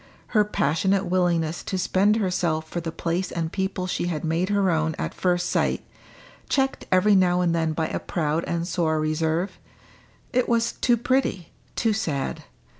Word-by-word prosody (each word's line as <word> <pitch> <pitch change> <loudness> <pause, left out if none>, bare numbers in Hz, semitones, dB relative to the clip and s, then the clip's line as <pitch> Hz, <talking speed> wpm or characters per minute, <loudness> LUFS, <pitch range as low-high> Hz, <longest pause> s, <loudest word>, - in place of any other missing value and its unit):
Her 215 -3 +4
passionate 190 +1 +1
willingness 175 -2 +1
to 190 - -2
spend 195 +3 +3
herself 175 -6 0
for 175 +2 -4
the 165 -1 -4
place 170 +3 -2
and 165 -1 -2
people 190 -1 -2
she 175 -1 -2
had 160 -4 -3
made 165 +4 0
her 200 -2 +2
own 160 -1 0
at - - -3
first 180 -1 0
sight, - - 0 0.7
checked 270 -1 0
every 185 +3 +5
now 180 -2 +4
and 175 -2 +2
then 160 -1 0
by 160 0 -1
a - - -3
proud 160 -1 -1
and 170 0 -2
sore 160 -4 0
reserve 160 +4 -1 0.7
it 250 0 +2
was 230 0 +2
too 240 -2 +2
pretty, 240 -7 0 0.2
too 225 -2 +1
sad. 155 -11 -2
175 Hz, 170 wpm, -24 LUFS, 160-195 Hz, 0.7 s, every